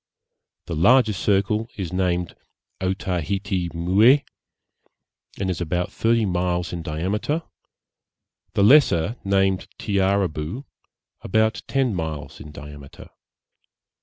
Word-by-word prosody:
The 85 - -4
larger 110 +7 +4
circle 100 +4 0
is 95 -3 -4
named 90 -2 -1 0.5
Otaheite 95 0 -2
Mooé, 105 +12 +4 1.2
and 95 - -1
is 90 -2 -2
about 90 +1 -2
thirty 115 0 +1
miles 90 -2 -1
in 85 - -4
diameter; 100 - -2 1.1
the 100 - +3
lesser, 105 - +5
named 95 -1 +1
Tiaraboo, 95 - -1 0.6
about 110 +2 +1
ten 135 -4 +1
miles 80 -5 -5
in 75 - -10
diameter. 75 -2 -11
95 Hz, 100 wpm, -23 LUFS, 85-105 Hz, 1.2 s, lesser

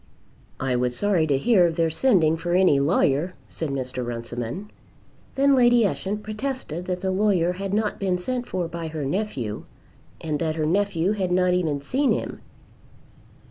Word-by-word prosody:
"I 130 -1 0
was 125 0 0
sorry 190 -4 +2
to 140 -3 +2
hear 185 - +4
of 165 - -3
their 165 -1 +1
sending 165 -6 +3
for 175 +1 -3
any 180 -7 +4
lawyer," 150 +3 +1
said 160 - -4
Mr. 130 -2 -3
Runciman. 120 - -5 0.6
Then 275 +1 +4
Lady 240 -3 +5
Ushant 205 +1 -2
protested 215 - -4
that 180 0 -3
the 190 - 0
lawyer 185 -3 +2
had 195 +1 -5
not 210 +1 0
been 185 -2 0
sent 245 +6 -3
for 180 -2 -2
by 170 0 -5
her 155 -2 -4
nephew, 140 - -3 0.5
and 155 -2 -3
that 160 -2 -1
her 155 -1 -1
nephew 185 +1 +1
had 190 -4 -1
not 180 0 +3
even 160 -6 0
seen 270 - +1
him. - - -4
180 Hz, 170 wpm, -24 LUFS, 155-205 Hz, 0.6 s, Lady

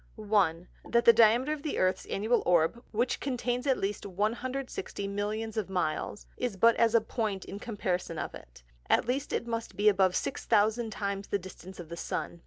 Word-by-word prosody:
1. 195 -6 +1 0.2
That 235 0 +3
the 235 - +9
Diameter 235 +6 +5
of 305 - -6
the 300 - -3
Earth's 185 0 +1
Annual 220 +5 +1
Orb 175 +7 +2
(which 240 +3 0
contains 250 0 -2
at 265 - +3
least 200 +1 -2
160 225 +2 -3
Millions 210 +2 -3
of 210 -3 -1
Miles) 180 +2 -2
is 245 -6 -2
but 230 +4 +5
as 230 0 +3
a 230 - +6
Point 215 -4 -3
in 200 - -7
comparison 185 -7 -3
of - - -4
it; - - -13 0.3
at - - +4
least 270 +4 -2
it - - -1
must 230 -1 -4
be 205 +1 +1
above 190 -2 +3
6000 220 -2 +1
times 200 -2 -3
the - - 0
Distance 190 0 -11
of 170 -2 -8
the 170 - -6
Sun. 170 - -4
215 Hz, 190 wpm, -30 LUFS, 190-235 Hz, 0.3 s, the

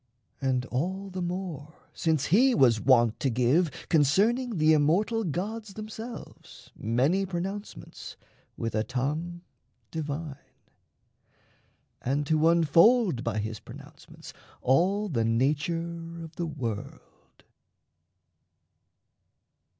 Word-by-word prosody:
And 130 -2 0
all 190 +10 -3
the 185 0 -4
more 175 -4 -5 0.2
since 160 -5 0
he 255 +4 +5
was 120 - +4
wont 120 -4 +4
to 135 - +1
give, 130 +8 +2 0.2
Concerning 205 - +2
the 155 0 +5
immortal 185 +10 +2
gods 200 +5 -4
themselves, 220 +2 -9
Many 135 - +1
pronouncements 190 +3 -6 0.4
with 115 - -3
a 110 - +1
tongue 150 +9 -3 0.5
divine, 150 -2 -4 1.6
And 140 +3 -1
to 155 +2 +3
unfold 170 - +4
by 115 -3 -2
his 110 +1 -3
pronouncements - - -13 0.3
all 190 +11 +2
The 125 - 0
nature 165 +7 -1
of 160 -1 -11
the 170 - -3
world. 120 -9 -7
160 Hz, 100 wpm, -28 LUFS, 135-190 Hz, 1.6 s, he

